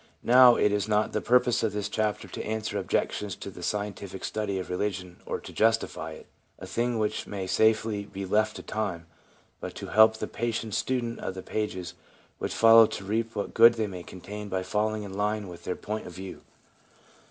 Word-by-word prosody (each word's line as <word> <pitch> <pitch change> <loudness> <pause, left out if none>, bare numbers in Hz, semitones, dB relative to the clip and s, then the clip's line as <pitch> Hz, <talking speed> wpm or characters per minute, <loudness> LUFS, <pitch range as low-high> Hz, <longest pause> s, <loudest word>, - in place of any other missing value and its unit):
Now, 125 0 +8
it 105 - +3
is 105 0 0
not 105 0 +1
the - - 0
purpose 125 0 +3
of 110 -3 0
this 105 0 -2
chapter 110 -1 -1
to - - -6
answer 110 -1 -2
objections 100 0 -1
to 100 - -8
the 90 - -11
scientific 100 0 -4
study 105 -3 -2
of 95 - -4
religion 90 -2 -3
or - - -2
to - - -11
justify 115 +1 +1
it - - -12 0.2
— - - -41
a - - -9
thing 120 0 -1
which 105 -1 -1
may 100 -2 -4
safely 110 +2 +2
be 100 -1 -6
left 110 +3 +1
to - - -8
time 95 -6 -3 0.3
— - - -35
but - - -6
to - - -7
help 110 0 +6
the - - -3
patient 115 -2 -3
student 120 -1 -1
of 95 - -4
the 95 - -7
pages 95 -5 -3 0.5
which - - -3
follow 115 0 +7
to 100 - -6
reap 115 +3 -1
what 100 - -3
good 115 +1 +7
they 110 -2 0
may 95 -3 -6
contain 100 +5 -8
by 95 -1 -1
falling 105 +2 -1
in 100 -2 -8
line 105 +1 -1
with 85 -1 -11
their 90 - -2
point 105 +1 -5
of 90 - -9
view. 95 +2 -8
105 Hz, 210 wpm, -27 LUFS, 95-110 Hz, 0.5 s, Now